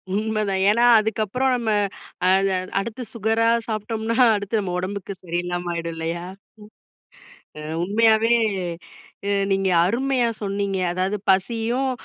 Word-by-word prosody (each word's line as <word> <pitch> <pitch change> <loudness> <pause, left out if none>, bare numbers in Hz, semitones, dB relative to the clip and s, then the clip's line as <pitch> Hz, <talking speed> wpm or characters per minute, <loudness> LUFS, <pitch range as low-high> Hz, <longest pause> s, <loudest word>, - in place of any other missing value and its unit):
உண்மதான். 210 -2 -1
ஏன்னா, 235 +3 +4
அதுக்கு 220 0 -2
அப்புறம் 255 +6 0
நம்ம 230 -3 -1 0.6
அத 195 +1 +3 0.3
அடுத்து 230 +5 -5
சுகரா 225 0 +1 0.2
சாப்ட்டோம்னா 220 +1 -3 0.2
அடுத்து 205 +2 -1
நம்ம 180 -2 -4
உடம்புக்கு 200 +1 -5
சரி 175 0 -3
இல்லாம 175 0 -3
ஆயிடும் 170 0 -4
இல்லயா! 165 +2 -4
ம். 190 - -10 1.3
அ 155 +1 -5
உண்மையாவே 220 +3 +3 0.9
அ - - +1 0.2
நீங்க 195 -1 +1
அருமையா 245 +4 +1
சொன்னீங்க. 200 -1 -2
அதாவது 185 +3 -1
பசியும், 230 +7 +1
205 Hz, 125 wpm, -22 LUFS, 190-225 Hz, 1.3 s, ஏன்னா